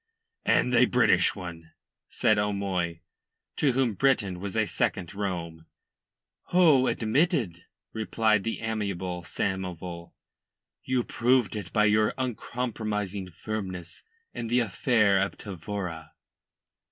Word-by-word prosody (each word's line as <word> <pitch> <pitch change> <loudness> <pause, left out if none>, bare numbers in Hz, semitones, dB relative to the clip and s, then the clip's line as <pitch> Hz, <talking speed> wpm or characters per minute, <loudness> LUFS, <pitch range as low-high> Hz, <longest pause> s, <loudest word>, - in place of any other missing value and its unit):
"And - - +3
a - - +6
British - - +4
one," 85 -4 -9 0.3
said 110 -1 +2
O'Moy, 95 -5 -1 0.6
to 140 -4 +2
whom 130 -3 +1
Britain 100 -6 +1
was 100 +3 -4
a 110 - +3
second 95 -2 -1
Rome. 85 -5 -4 0.8
"Oh, 155 -8 +5
admitted," 115 - 0 0.3
replied 110 -1 +1
the 115 - -3
amiable 100 -5 -3
Samoval. 90 -1 -4 0.7
"You 130 -1 0
proved 120 -4 +2
it 100 -5 -5
by 105 -1 +3
your 105 0 +3
uncompromising 110 -6 -3
firmness 95 -1 -6 0.3
in 115 - -4
the 120 +2 +3
affair 105 -2 +3
of 95 +1 -1
Tavora." 90 -4 -6
105 Hz, 110 wpm, -27 LUFS, 90-115 Hz, 0.8 s, a